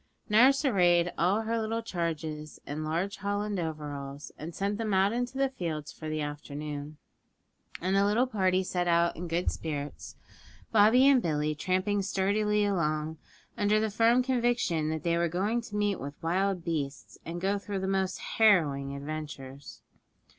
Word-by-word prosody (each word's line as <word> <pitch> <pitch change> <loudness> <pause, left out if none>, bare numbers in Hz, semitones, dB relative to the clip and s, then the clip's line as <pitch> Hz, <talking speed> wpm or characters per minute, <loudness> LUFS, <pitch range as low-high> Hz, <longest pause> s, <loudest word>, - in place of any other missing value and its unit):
Nurse 260 +7 +5
arrayed 175 -7 +3
all 190 +6 +2
her 225 +1 -1
little 225 +1 -2
charges 160 -5 -4
in 150 +2 -4
large 175 +6 -2
holland 205 0 -2
overalls, 145 -3 -5
and 160 +2 -8
sent 200 +2 -1
them 215 -3 0
out 195 +3 +3
into 245 +2 -2
the 275 0 +3
fields 160 - -4
for 155 - -7
the 155 0 -2
afternoon. 145 0 -6 0.8
And 185 +3 +1
the 195 - +4
little 210 +5 +3
party 190 -6 +1
set 180 -1 -1
out 170 0 +3
in 175 +2 -5
good 170 +2 0
spirits, 145 -2 -5 0.6
Bobby 225 +5 +6
and 275 -3 +6
Billy 155 -3 0
tramping 185 +6 0
sturdily 205 +2 +1
along, 160 -5 -1 0.4
under 210 +1 +2
the 220 -1 0
firm 230 +4 +4
conviction 240 - +1
that 160 0 -3
they 170 0 +1
were 170 0 +1
going 205 +8 0
to 220 -2 -9
meet 205 -2 +1
with 140 +2 -6
wild 185 +2 0
beasts, 145 -5 -4
and 170 +1 -5
go 195 +2 0
through 200 -1 -4
the 190 - -2
most 190 -1 0
harrowing 145 -11 +2
adventures. 140 -2 -7
185 Hz, 160 wpm, -29 LUFS, 155-210 Hz, 0.8 s, Bobby